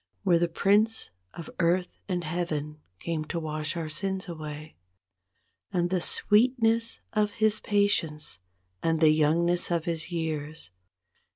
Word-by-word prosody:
Where 175 Hz, -4 st, +4 dB
the 175 Hz, -, +2 dB
Prince 205 Hz, -, +2 dB, 0.2 s
of 170 Hz, -, -7 dB
Earth 180 Hz, +1 st, +1 dB
and 180 Hz, -2 st, -1 dB
Heaven 155 Hz, -2 st, -3 dB, 0.2 s
came 165 Hz, -2 st, -2 dB
to 170 Hz, -, -3 dB
wash 155 Hz, 0 st, -1 dB
our 165 Hz, -2 st, -3 dB
sins 190 Hz, +5 st, -2 dB
away; 155 Hz, -2 st, -7 dB, 1.0 s
And 175 Hz, -2 st, 0 dB
the 185 Hz, -2 st, +1 dB
sweetness 230 Hz, +2 st, +2 dB
of 210 Hz, -1 st, +1 dB
His 215 Hz, -1 st, +2 dB
patience, 165 Hz, -, 0 dB, 0.4 s
and 165 Hz, -1 st, +1 dB
the 155 Hz, -1 st, +5 dB
young¬ 155 Hz, +2 st, +3 dB
ness 175 Hz, 0 st, +1 dB
of 170 Hz, -2 st, 0 dB
His 165 Hz, 0 st, -2 dB
years. 155 Hz, -, -4 dB
170 Hz, 135 wpm, -28 LUFS, 155-195 Hz, 1.0 s, the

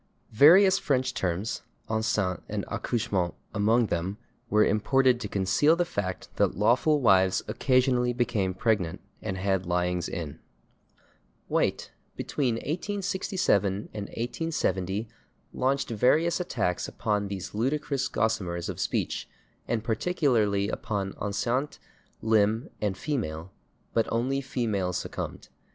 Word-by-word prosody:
Various 190 Hz, -, +7 dB
French 130 Hz, -3 st, 0 dB
terms, 95 Hz, +3 st, -2 dB, 0.3 s
/enceinte/ 105 Hz, -5 st, 0 dB
and -, -, -3 dB
/accouchement/ 100 Hz, -7 st, -1 dB, 0.2 s
among 110 Hz, +3 st, +3 dB
them, 95 Hz, +1 st, -2 dB, 0.3 s
were 105 Hz, -1 st, +4 dB
imported 125 Hz, +4 st, +3 dB
to 110 Hz, -, -4 dB
conceal 100 Hz, -, +3 dB
the 175 Hz, +1 st, +1 dB
fact 100 Hz, -, -4 dB
that -, -, +2 dB
lawful 125 Hz, +8 st, +3 dB
wives 95 Hz, -5 st, +4 dB
occasionally 125 Hz, -2 st, +2 dB
became 115 Hz, -6 st, 0 dB
pregnant 100 Hz, -6 st, 0 dB, 0.2 s
and 95 Hz, -, -3 dB
had 95 Hz, -1 st, 0 dB
lyings 90 Hz, 0 st, 0 dB
in. 80 Hz, -6 st, -5 dB, 1.1 s
White, -, -, 0 dB, 0.2 s
between 130 Hz, -6 st, -1 dB
1867 185 Hz, -, 0 dB, 0.2 s
and 105 Hz, -2 st, -4 dB
1870, 110 Hz, -, -2 dB, 0.5 s
launched 135 Hz, 0 st, 0 dB
various 150 Hz, -, +3 dB
attacks 115 Hz, -, -1 dB
upon 105 Hz, -1 st, -1 dB
these 95 Hz, -2 st, -6 dB
ludicrous 135 Hz, +5 st, 0 dB
gossamers 95 Hz, -7 st, -1 dB
of -, -, -5 dB
speech, -, -, -2 dB, 0.4 s
and 115 Hz, -2 st, -1 dB
particularly 115 Hz, -, +1 dB
upon 100 Hz, -3 st, -3 dB
/enceinte/, 120 Hz, +7 st, -2 dB, 0.5 s
/limb/ 110 Hz, +1 st, +2 dB
and 105 Hz, -3 st, 0 dB
/female/, 95 Hz, -, -3 dB, 0.4 s
but 115 Hz, -1 st, +1 dB
only 130 Hz, +4 st, 0 dB
/female/ 105 Hz, -9 st, -1 dB
succumbed. -, -, -5 dB
110 Hz, 115 wpm, -27 LUFS, 95-130 Hz, 1.1 s, Various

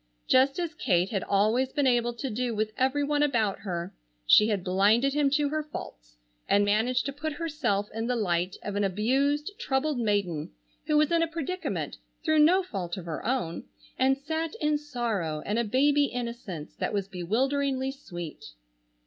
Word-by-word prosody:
Just 265 Hz, +2 st, +4 dB
as 340 Hz, -2 st, -2 dB
Kate 180 Hz, -, +1 dB
had 195 Hz, -4 st, -1 dB
always 220 Hz, +6 st, +2 dB
been 285 Hz, -2 st, 0 dB
able 240 Hz, -2 st, +2 dB
to 260 Hz, +2 st, -4 dB
do 240 Hz, +1 st, -2 dB
with 215 Hz, 0 st, -1 dB
every 265 Hz, +2 st, +1 dB
one 290 Hz, 0 st, +1 dB
about 230 Hz, -9 st, +1 dB
her, 175 Hz, -3 st, -4 dB, 0.3 s
she 210 Hz, -, +7 dB
had 205 Hz, -5 st, -1 dB
blinded 205 Hz, +8 st, +3 dB
him 290 Hz, -1 st, +3 dB
to 285 Hz, +1 st, +1 dB
her 310 Hz, +1 st, -1 dB
faults, -, -, -9 dB, 0.3 s
and 205 Hz, 0 st, +4 dB
managed 225 Hz, +5 st, +1 dB
to 275 Hz, -, -3 dB
put 310 Hz, +2 st, -4 dB
herself 290 Hz, -11 st, -1 dB
in 225 Hz, +1 st, -2 dB
the 250 Hz, -, +1 dB
light 180 Hz, -4 st, 0 dB
of 205 Hz, -, -4 dB
an 205 Hz, -, +1 dB
abused, 270 Hz, -, +1 dB
troubled 280 Hz, -, 0 dB
maiden, 200 Hz, -8 st, 0 dB, 0.4 s
who 305 Hz, -, +3 dB
was 305 Hz, +2 st, +3 dB
in 335 Hz, -1 st, +3 dB
a 330 Hz, -, +2 dB
predicament 335 Hz, +3 st, -4 dB, 0.3 s
through 315 Hz, -1 st, +3 dB
no 355 Hz, +6 st, +5 dB
fault 185 Hz, -, -4 dB
of 180 Hz, -, -7 dB
her 165 Hz, -2 st, -5 dB
own, 225 Hz, -9 st, -2 dB, 0.3 s
and 265 Hz, +1 st, +3 dB
sat 320 Hz, +6 st, -3 dB
in 300 Hz, -8 st, +1 dB
sorrow 225 Hz, -, -2 dB
and 210 Hz, +3 st, 0 dB
a -, -, +2 dB
baby 285 Hz, +6 st, +3 dB
innocence 235 Hz, -, -5 dB
that -, -, -2 dB
was 200 Hz, -2 st, -1 dB
bewilderingly 265 Hz, +8 st, 0 dB
sweet. 175 Hz, -, -8 dB
245 Hz, 180 wpm, -28 LUFS, 200-290 Hz, 0.4 s, she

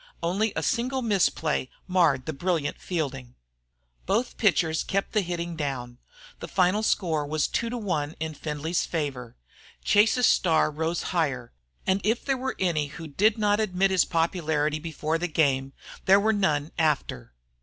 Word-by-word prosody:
Only 200 Hz, +6 st, +1 dB
a 160 Hz, -, -1 dB
single 255 Hz, -, 0 dB
misplay 180 Hz, -, +1 dB, 0.2 s
marred 165 Hz, -8 st, +2 dB
the 160 Hz, -, -3 dB
brilliant 165 Hz, -1 st, -1 dB
fielding. 135 Hz, -8 st, -4 dB, 0.7 s
Both 220 Hz, +6 st, 0 dB
pitchers 165 Hz, -6 st, +2 dB
kept 195 Hz, 0 st, -2 dB
the 215 Hz, -, +2 dB
hitting 170 Hz, -2 st, -4 dB
down. 130 Hz, -5 st, -4 dB, 0.4 s
The -, -, -6 dB
final 185 Hz, +2 st, +2 dB
score 165 Hz, -8 st, +1 dB
was 150 Hz, +1 st, 0 dB
2 230 Hz, -, -1 dB
to 245 Hz, -, -3 dB
1 160 Hz, -9 st, -2 dB
in 160 Hz, 0 st, -3 dB
Findlay's 155 Hz, +3 st, -2 dB
favor. 135 Hz, -7 st, -4 dB, 0.5 s
Chase's 215 Hz, +4 st, +4 dB
star 160 Hz, -6 st, +3 dB
rose 160 Hz, +3 st, -2 dB
higher; 140 Hz, -8 st, -1 dB, 0.3 s
and 190 Hz, +1 st, +1 dB
if 225 Hz, +4 st, 0 dB
there 275 Hz, -, +1 dB
were 260 Hz, +1 st, -3 dB
any 165 Hz, -6 st, 0 dB
who 160 Hz, +3 st, -9 dB
did 205 Hz, +9 st, +2 dB
not 210 Hz, -1 st, +2 dB
admit 195 Hz, -2 st, +1 dB
his 185 Hz, -2 st, +4 dB
popularity 160 Hz, -3 st, 0 dB
before 160 Hz, 0 st, -2 dB
the 175 Hz, -, -1 dB
game, 135 Hz, -4 st, +1 dB, 0.3 s
there 195 Hz, +1 st, +6 dB
were 220 Hz, +2 st, +2 dB
none 155 Hz, -7 st, 0 dB
after. 135 Hz, -, -1 dB
165 Hz, 155 wpm, -26 LUFS, 150-195 Hz, 0.7 s, there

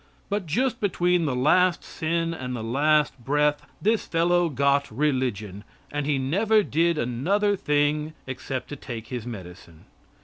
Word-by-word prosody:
But 200 Hz, -3 st, -2 dB
just 250 Hz, -, 0 dB
between 180 Hz, -3 st, +2 dB
the 135 Hz, -4 st, 0 dB
last 170 Hz, +7 st, +3 dB
sin 165 Hz, 0 st, -2 dB
and 125 Hz, -5 st, -5 dB
the 115 Hz, -, -5 dB
last 145 Hz, +4 st, +2 dB
breath, 150 Hz, +2 st, +1 dB, 0.2 s
this 220 Hz, +2 st, +1 dB
fellow 175 Hz, +1 st, +2 dB
got 140 Hz, 0 st, +1 dB
religion, 110 Hz, -7 st, -1 dB, 0.3 s
and 145 Hz, -1 st, -2 dB
he 145 Hz, -2 st, +2 dB
never 205 Hz, +11 st, +2 dB
did 170 Hz, -1 st, +1 dB
another 180 Hz, -, +1 dB
thing 150 Hz, -1 st, 0 dB
except 130 Hz, 0 st, -5 dB
to 145 Hz, -, -5 dB
take 115 Hz, -4 st, -8 dB
his 125 Hz, -2 st, -5 dB
medicine. 90 Hz, -6 st, -10 dB
150 Hz, 145 wpm, -25 LUFS, 125-170 Hz, 0.3 s, last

